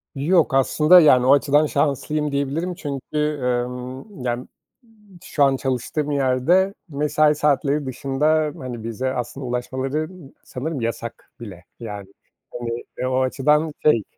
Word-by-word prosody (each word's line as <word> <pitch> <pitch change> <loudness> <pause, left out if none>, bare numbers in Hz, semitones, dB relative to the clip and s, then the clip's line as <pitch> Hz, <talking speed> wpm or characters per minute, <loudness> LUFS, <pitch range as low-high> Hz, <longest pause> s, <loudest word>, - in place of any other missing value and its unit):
Yok, 155 +1 +2
aslında, 150 +6 +6
yani, 130 -6 +5
o 135 - +6
açıdan 145 +2 +3
şanslıyım 150 +1 -1
diyebilirim 140 +6 -2
çünkü, 140 -5 -7 0.3
emm, 125 - -4
yani, 120 0 -3 0.4
m 210 -5 -21
şu 145 -4 0
an 135 -1 +4
çalıştığım 135 +3 -2
yerde 140 +8 +2 0.2
mesai 150 +1 +2
saatleri 145 0 +1
dışında, 150 +4 0
hani, 125 -4 -7
bize 125 +4 -3
aslında 130 +2 -5
ulaşmaları 130 +5 -3 0.3
sanırım 140 +1 -5
yasak 115 0 -5
bile. 95 -6 -10 0.2
Yani, 105 -4 -7 0.5
hani, 120 0 -4
eee, 125 - -2
o 130 0 +1
açıdan 150 +4 +2
şey, 115 -8 +4
140 Hz, 130 wpm, -22 LUFS, 125-150 Hz, 0.5 s, aslında